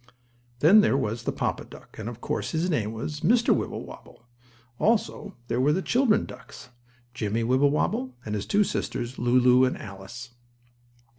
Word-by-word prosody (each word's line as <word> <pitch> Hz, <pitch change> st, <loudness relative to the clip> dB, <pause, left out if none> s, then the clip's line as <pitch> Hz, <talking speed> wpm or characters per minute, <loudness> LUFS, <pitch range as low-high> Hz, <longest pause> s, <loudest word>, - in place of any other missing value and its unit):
Then 195 Hz, +8 st, +7 dB
there 135 Hz, -, +2 dB
was 115 Hz, -3 st, -2 dB
the -, -, 0 dB
papa -, -, -2 dB
duck, -, -, -15 dB
and, 110 Hz, +1 st, -4 dB
of 120 Hz, 0 st, -10 dB
course, -, -, -3 dB
his 170 Hz, +3 st, 0 dB
name 110 Hz, -9 st, -1 dB
was 130 Hz, +7 st, -5 dB
Mr. 230 Hz, +9 st, +3 dB
Wibblewobble. -, -, -7 dB, 0.5 s
Also 210 Hz, -2 st, 0 dB
there 120 Hz, +1 st, 0 dB
were 145 Hz, +3 st, +3 dB
the 190 Hz, -, -1 dB
children 245 Hz, -4 st, +2 dB
ducks; 125 Hz, -, -12 dB, 0.4 s
Jimmie 115 Hz, -1 st, -2 dB
Wibblewobble 130 Hz, 0 st, +1 dB
and 105 Hz, -, -4 dB
his 105 Hz, -1 st, -3 dB
two 205 Hz, +1 st, +3 dB
sisters, 120 Hz, -9 st, -4 dB
Lulu 125 Hz, +1 st, +4 dB
and 130 Hz, -, +1 dB
Alice. 115 Hz, +5 st, -9 dB
130 Hz, 155 wpm, -26 LUFS, 115-165 Hz, 0.5 s, Then